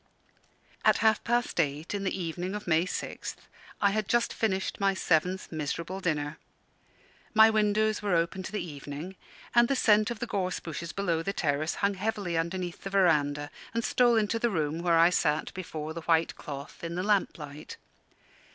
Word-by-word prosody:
At - - +5
half 220 -1 +4
past 240 -4 0
eight 150 +2 -1
in 200 -1 -2
the 190 0 -2
evening 175 +3 -3
of 210 - -6
May 165 0 +3
6th 185 - -5 0.4
I 200 - +3
had 215 -1 -1
just 240 +1 +2
finished 190 -4 -1
my 195 -1 +2
seventh 180 +2 +1
miserable 165 +4 -3
dinner. 150 -5 -2 1.0
My 220 +1 +8
windows 215 0 +2
were 200 -4 +1
open 170 +3 0
to 190 - -7
the 210 -4 -2
evening, 145 +3 -7 0.4
and 240 0 +6
the 275 - +1
scent 215 -3 +4
of 235 - -4
the 240 - -3
gorse 185 -5 -2
bushes 165 0 -6
below 175 -5 0
the 195 +4 -2
terrace 155 -1 0
hung 200 - +2
heavily 200 -3 -2
underneath 175 +2 -2
the 195 - -4
verandah 145 -7 +2 0.2
and 230 - 0
stole 245 -1 +4
into 220 +1 +1
the 235 - +2
room 160 -5 -1
where 170 -1 +3
I 170 +2 +6
sat 150 -3 0
before 160 -4 -5
the 170 - -6
white 165 0 +2
cloth, 140 +1 -8
in 170 0 -4
the 180 - -1
lamp 205 -2 +1
light. 150 -1 -9
180 Hz, 180 wpm, -29 LUFS, 160-210 Hz, 1.0 s, My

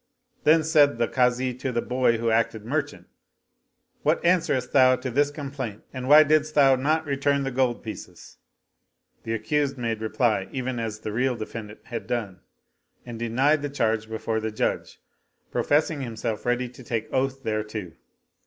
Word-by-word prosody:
Then 160 +1 +5
said 150 -5 +4
the 115 0 +1
Kazi 125 0 +1
to 130 +1 -4
the 120 - 0
boy 125 -2 +1
who 115 0 0
acted 110 -1 0
merchant, 145 +3 -3 0.5
" - - -48
What - - +1
answerest 165 -8 +2
thou 130 -2 +6
to 130 0 -5
this 145 +4 +2
complaint 135 -7 -6
and 130 0 -5
why 150 +1 +9
didst 155 0 +1
thou 135 -2 +6
not 155 +5 0
return 140 0 0
the 135 - -2
gold 125 -2 0
pieces? 110 - -9 0.4
" - - -47
The 115 0 -1
accused 140 +5 -1
made 115 -3 -2
reply 110 -3 0
even 130 -2 -3
as 110 -2 -4
the 105 - -5
real 125 +2 +1
defendant 110 -1 -8
had 115 -2 -6
done 105 -7 -3 0.7
and 120 -2 -7
denied 130 +6 +2
the 145 - -3
charge 110 -5 -1
before 110 0 -2
the 110 0 -3
Judge, 110 - -2 0.5
professing 150 0 +1
himself 115 -2 -4
ready 125 +1 +1
to 125 +1 -13
take 115 -2 -3
oath 135 +1 -1
thereto. 110 -4 -3
125 Hz, 170 wpm, -25 LUFS, 115-140 Hz, 0.7 s, why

